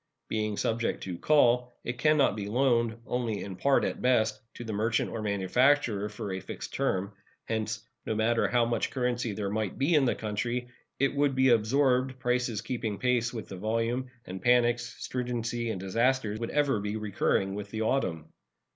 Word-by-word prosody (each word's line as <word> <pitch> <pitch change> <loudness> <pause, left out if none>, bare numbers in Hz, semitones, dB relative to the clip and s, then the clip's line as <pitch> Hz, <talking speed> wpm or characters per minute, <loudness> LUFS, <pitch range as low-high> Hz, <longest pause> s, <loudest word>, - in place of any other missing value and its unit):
Being 105 -1 -1
subject 115 +1 -1
to 90 -3 -5
"call," 125 -4 +3
it 120 0 -4
can 155 +3 +4
not 140 - +3
be 100 -2 -4
loaned, 120 -1 +2
only 120 -4 -2
in 95 -2 -6
part 140 +8 +3
at - - -3
best, 110 -4 +2
to - - -7
the 110 -2 -5
merchant 110 +2 0
or 115 - -4
manufacturer 105 +2 +2
for 105 -2 -5
a 95 - -3
fixed - - -8
term. 100 +2 -1 0.3
Hence, 110 0 -3 0.2
no 110 - -2
matter 115 +2 +2
how 120 -1 +2
much 115 -1 0
currency 125 -3 -1
there 100 -1 -3
might 110 -2 -2
be 140 +6 +2
in 145 -4 +5
the 120 - +1
country, 120 +3 -3 0.3
it 140 0 +2
would 140 -1 +1
be 130 0 +4
absorbed, 130 +3 +3
prices 125 -3 0
keeping 115 -3 -3
pace 125 -1 +1
with 115 -3 -6
the 95 - -8
volume, 115 +5 -1 0.2
and 95 0 -7
panics, 120 +1 +3 0.2
stringency, 120 -2 -2
and 105 -4 -3
disasters 110 +3 0
would 115 - -3
ever 145 -6 +2
be 105 +1 -3
recurring 100 -2 0
with 100 0 -5
the 110 +1 -2
autumn. 85 - -1
115 Hz, 180 wpm, -29 LUFS, 105-125 Hz, 0.3 s, in